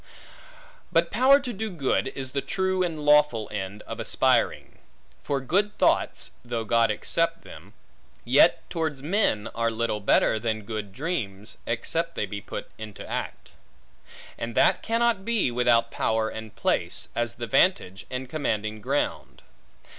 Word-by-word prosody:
But 170 -1 +2
power 260 +6 +6
to 255 -4 -5
do 220 +2 -3
good, 150 -10 0
is 130 -1 -5
the 140 - -1
true 190 +2 0
and 160 -4 -2
lawful 150 -7 +4
end 100 0 -5
of - - -7
aspiring. - - +1 0.4
For 140 -1 -1
good 200 +10 0
thoughts - - +1
(though 120 -2 -3
God 115 +1 +3
accept 165 +9 -1
them) - - -13 0.5
yet, - - +4
towards 160 -5 -2
men, 155 - +1
are 115 0 0
little 115 -1 -1
better 105 +1 +3
than 110 -1 -2
good 105 -1 -5
dreams, 110 - -4
except 165 +9 -2
they - - -1
be 100 +1 -6
put - - -7
in 110 -2 -8
act; - - -5 0.9
and 115 -1 -4
that - - +4
cannot 230 -3 +1
be, 225 - +1
without 120 -1 +3
power 110 0 0
and 110 -1 -8
place, - - -1
as 120 0 -1
the 120 - -4
vantage, 125 - +1
and 130 0 -4
commanding 110 -7 -2
ground. 140 +6 -2
125 Hz, 145 wpm, -26 LUFS, 110-170 Hz, 0.9 s, power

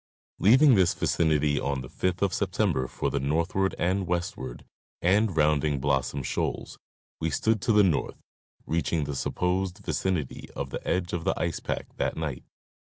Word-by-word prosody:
Leaving 130 +7 +6
this 95 -5 +4
vicinity 75 -3 +2
on 70 -1 -2
the 65 - -8
5th 90 +7 -1
of 95 -3 +1
September 65 - 0
for - - -2
the 70 - 0
north 75 +5 0
ward 95 0 +1
and 95 +1 0
westward, 85 -8 -3 0.3
and 95 0 +2
rounding 75 -1 +2
Blossom 65 0 0
shoals, - - -3 0.4
we 80 - 0
stood 110 +7 +1
to 115 - +1
the 105 -1 +6
north, 85 -7 0 0.5
reaching 85 -1 0
the 70 -1 -4
supposed 90 +6 -1
vicinity 95 - -2
of - - -4
the - - -5
edge 90 0 -1
of 85 -1 -2
the - - 0
ice 85 -1 -1
pack - - -3
that - - -1
night. 75 -5 -4
85 Hz, 170 wpm, -27 LUFS, 70-95 Hz, 0.5 s, Leaving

